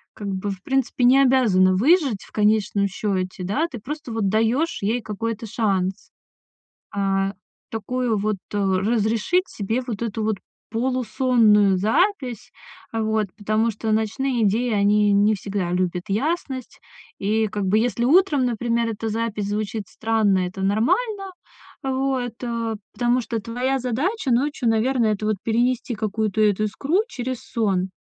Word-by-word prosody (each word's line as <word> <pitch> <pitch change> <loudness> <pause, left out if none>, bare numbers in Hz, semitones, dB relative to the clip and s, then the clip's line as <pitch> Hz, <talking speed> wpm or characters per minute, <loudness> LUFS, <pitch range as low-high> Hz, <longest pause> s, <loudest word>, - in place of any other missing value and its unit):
как 205 - -6
бы, 195 +1 -3
в 190 -1 -8
принципе, 265 -2 0
не 260 +3 +6
обязана 225 -9 +4
выжить 275 - +3
в - - -17
конечном 210 -1 +2
счете, 190 -2 -3
да, 280 - 0
ты 240 - -6
просто 300 +3 -6
вот 225 -3 0
даешь 225 - +1
ей 220 +5 0
какой-то 225 +1 -4
шанс, 195 -2 -1 0.8
а, 195 -1 0 0.4
такую 225 +1 -1
вот, 210 +1 0 0.2
э, 205 - -1
разрешить 220 - +1
себе 220 +4 -2
вот 235 -3 -4
эту 225 -1 -2
вот 215 -1 0 0.3
полусонную 230 -4 +3
запись, 250 - 0 0.4
а, 225 -1 -1
вот, 220 -1 0
потому 215 +2 +1
что 220 +1 -4
ночные 230 +3 0
идеи 230 +4 +1
они 205 0 +3
не 205 +2 +4
всегда 195 -3 -3
любят 180 -1 0
ясность. 265 - -2 0.4
И 220 +2 +1
как 205 0 -3
бы 200 +3 +3
если 240 +1 0
утром, 300 -1 +4
например, 235 -1 0
эта 225 +1 -4
запись 215 -2 -2
звучит 210 0 -2
странно, 220 -4 +1
это 185 +2 -7
нормально, 385 - 0 0.5
вот, 265 -2 -1
а, 230 -2 -2 0.2
потому 245 +1 +1
что 230 -1 -3
твоя 250 +5 -1
задача 265 - -1
ночью, 255 0 +1
наверное, 225 0 +2
это 210 - -6
вот 215 -1 +1
перенести 240 +2 0
какую-то 215 0 -1
эту 210 0 +2
искру 275 - 0
через 255 - -4
сон. 195 -5 0
225 Hz, 145 wpm, -23 LUFS, 205-250 Hz, 0.8 s, не